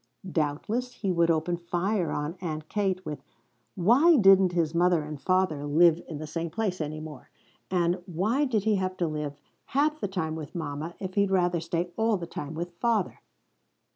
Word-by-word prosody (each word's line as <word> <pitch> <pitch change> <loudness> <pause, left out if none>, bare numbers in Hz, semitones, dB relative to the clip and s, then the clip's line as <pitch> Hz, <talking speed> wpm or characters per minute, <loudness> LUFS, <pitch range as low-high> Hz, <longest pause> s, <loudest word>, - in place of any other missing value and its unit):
Doubtless 190 +12 -1
he 200 -5 -2
would 170 -1 +2
open 165 +2 +1
fire 175 +2 -1
on 150 +3 -3
Aunt 155 -3 -4
Kate 190 -3 -1
with 150 -3 -5 0.5
Why 255 - +5
didn't 195 -4 +6
his 165 -2 +1
mother 175 -1 +3
and 150 -1 -7
father 185 -6 +1
live 165 +3 +4
in 155 - -6
the 155 - -6
same 165 +2 -4
place 185 0 -2
any 155 0 -4
more, 155 -3 -10 0.4
and 180 0 +1
Why 210 - +1
did 225 -7 0
he 215 -1 +2
have 185 0 -2
to 175 - 0
live 150 -2 -4 0.4
half 300 +2 +2
the - - -1
time 170 -5 -2
with 160 0 -7
mama 155 +1 -4
if 190 -1 -6
he'd 200 0 +2
rather 180 -2 +2
stay 170 +2 -2
all 225 -1 +2
the 175 - -5
time 155 -2 -6
with 175 +2 -4
father? 230 -5 0
175 Hz, 185 wpm, -27 LUFS, 155-195 Hz, 0.5 s, didn't